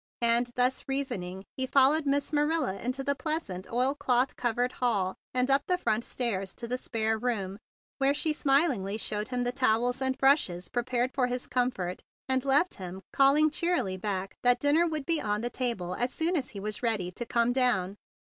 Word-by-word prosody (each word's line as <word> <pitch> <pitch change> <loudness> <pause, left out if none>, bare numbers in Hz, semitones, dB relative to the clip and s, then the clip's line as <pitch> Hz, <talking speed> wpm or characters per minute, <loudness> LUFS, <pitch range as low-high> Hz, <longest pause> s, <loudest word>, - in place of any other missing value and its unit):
And, 235 +1 +4
thus 250 +1 +1
reasoning, 215 -9 -3
he 260 0 -1
followed 280 +3 +4
Miss 280 +1 0
Ma¬ 295 -1 +2
nila 320 -13 0
into 255 +3 -3
the 280 - +1
pleasant 275 - -4
oilcloth 255 0 +1
covered 245 +1 0
hall, 205 -7 0 0.2
and 250 0 +2
up 275 +1 +5
the 360 - +2
front 225 -9 0
stairs 195 -8 -2
to 235 - -6
the 250 +2 -2
spare 220 -2 -1
room, 205 -5 -2 0.4
where 275 +1 +3
she 310 +1 +1
smilingly 270 - +1
showed 210 -1 -1
him 250 -1 -2
the 245 - 0
towels 245 0 +1
and 265 0 0
brushes 270 - +2
prepared 245 +1 -1
for 255 -3 +1
his 250 0 -3
comfort, 245 -8 -2 0.3
and 260 -1 +1
left 280 +6 +3
him, 190 0 -8
calling 290 +3 +4
cheerily 335 - 0
back 190 0 -4
that 245 0 +4
dinner 295 +5 +3
would 310 -4 -3
be 330 -2 +1
on 210 0 -1
the 240 +1 -3
table 230 -9 -2
as 245 +6 -1
soon 330 +5 0
as 280 -6 -1
he 200 - -8
was 210 +1 -4
ready 215 -7 0
to 210 - -5
come 235 +1 +1
down. 225 -7 +1
245 Hz, 190 wpm, -28 LUFS, 215-275 Hz, 0.4 s, up